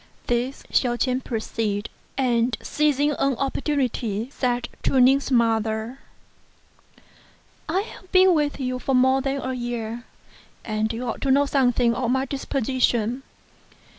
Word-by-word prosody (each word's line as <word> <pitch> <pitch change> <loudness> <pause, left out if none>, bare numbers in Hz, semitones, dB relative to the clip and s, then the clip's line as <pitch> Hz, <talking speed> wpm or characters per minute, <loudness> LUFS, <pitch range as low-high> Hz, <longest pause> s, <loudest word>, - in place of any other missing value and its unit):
This 245 +3 -1
Hsiao 245 -2 +2
ch'ien 255 +1 0
perceived, 220 -3 -2 0.3
and 240 -3 +1
seizing 295 -1 +1
an 275 -2 0
opportunity 260 -5 -1
said 245 -3 -1
to 265 - +2
Ning's 270 +3 +4
mother, 225 0 +1 1.7
"I 370 +4 +1
have 380 -3 -12
been 370 0 +6
with 295 -3 0
you 255 -1 -2
now 270 - +2
more 260 +1 +4
than 270 +1 -1
a 260 -1 -3
year, 240 -1 -4 0.6
and 215 0 -1
you 240 +2 -4
ought 230 - -4
to 275 - -1
know 280 +2 +4
some 270 -3 +3
thing 235 -1 +2
of 240 0 -1
my 265 +1 +1
disposition. 255 -3 0
255 Hz, 135 wpm, -24 LUFS, 235-275 Hz, 1.7 s, been